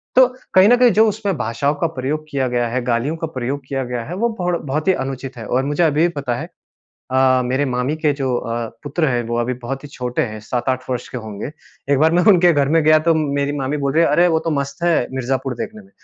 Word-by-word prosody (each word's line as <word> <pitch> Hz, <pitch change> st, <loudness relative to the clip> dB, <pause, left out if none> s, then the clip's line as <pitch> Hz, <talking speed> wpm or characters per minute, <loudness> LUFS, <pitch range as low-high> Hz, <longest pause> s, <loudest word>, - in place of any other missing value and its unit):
तो 255 Hz, 0 st, +7 dB, 0.3 s
कहीं 185 Hz, +1 st, +7 dB
न 245 Hz, -, +7 dB
कहीं 245 Hz, -1 st, +5 dB
जो 220 Hz, +2 st, +5 dB
उसमें 205 Hz, -2 st, -2 dB
भाषाओं 130 Hz, +6 st, -1 dB
का 165 Hz, +3 st, 0 dB
प्रयोग 150 Hz, +4 st, -2 dB
किया 135 Hz, -3 st, 0 dB
गया 120 Hz, -1 st, 0 dB
है, 130 Hz, +2 st, -1 dB
गालियों 125 Hz, +6 st, 0 dB
का 165 Hz, -, -3 dB
प्रयोग 135 Hz, -1 st, -4 dB
किया 135 Hz, -1 st, -2 dB
गया 125 Hz, -1 st, -4 dB
है 175 Hz, -, -6 dB
वो 235 Hz, +5 st, +1 dB
बढ 180 Hz, -1 st, 0 dB
बहुत 150 Hz, +3 st, -2 dB
ही 190 Hz, -, +5 dB
अनुचित 135 Hz, -1 st, -6 dB
है। 115 Hz, -, -7 dB
और 130 Hz, +4 st, 0 dB
मुझे 145 Hz, +4 st, +1 dB
अभी 155 Hz, -2 st, +2 dB
भी 170 Hz, -, +5 dB
पता 125 Hz, -4 st, -2 dB
है -, -, -6 dB, 0.6 s
अ, 130 Hz, 0 st, +3 dB
मेरे 130 Hz, +3 st, 0 dB
मामी 125 Hz, +2 st, -1 dB
के 155 Hz, -2 st, +1 dB
जो 130 Hz, -2 st, 0 dB
अ, 115 Hz, -1 st, -3 dB, 0.2 s
पुत्र 155 Hz, +2 st, 0 dB
हैं 120 Hz, -2 st, 0 dB
वो 120 Hz, -, -1 dB
अभी 125 Hz, +2 st, -1 dB
बहुत 135 Hz, +3 st, -4 dB
ही -, -, -8 dB
छोटे 125 Hz, -3 st, -2 dB
हैं, 110 Hz, -1 st, -7 dB
7-8 125 Hz, +3 st, -2 dB
वर्ष 125 Hz, -1 st, -3 dB
के 125 Hz, -, -5 dB
होंगे। 110 Hz, +2 st, -6 dB, 0.4 s
एक 140 Hz, -, +3 dB
बार 160 Hz, +3 st, +4 dB
मैं 175 Hz, +1 st, +3 dB
उनके 175 Hz, -1 st, +5 dB
घर 140 Hz, -3 st, +2 dB
में 165 Hz, +2 st, +3 dB
गया 155 Hz, 0 st, +6 dB
तो 165 Hz, -, +5 dB
मेरी 140 Hz, -2 st, 0 dB
मामी 135 Hz, +2 st, -1 dB
बोल 140 Hz, -2 st, -1 dB
रही 160 Hz, +3 st, +4 dB
है, 165 Hz, -, +3 dB
"अरे! 170 Hz, +4 st, +4 dB
वो 160 Hz, -2 st, +2 dB
तो 165 Hz, -, -3 dB
मस्त 140 Hz, +1 st, -3 dB
है 175 Hz, -1 st, +3 dB, 0.2 s
मिर्ज़ापुर 130 Hz, 0 st, -2 dB
देखने 215 Hz, -, -6 dB
में।" 195 Hz, -, -22 dB
140 Hz, 260 wpm, -19 LUFS, 125-160 Hz, 0.6 s, तो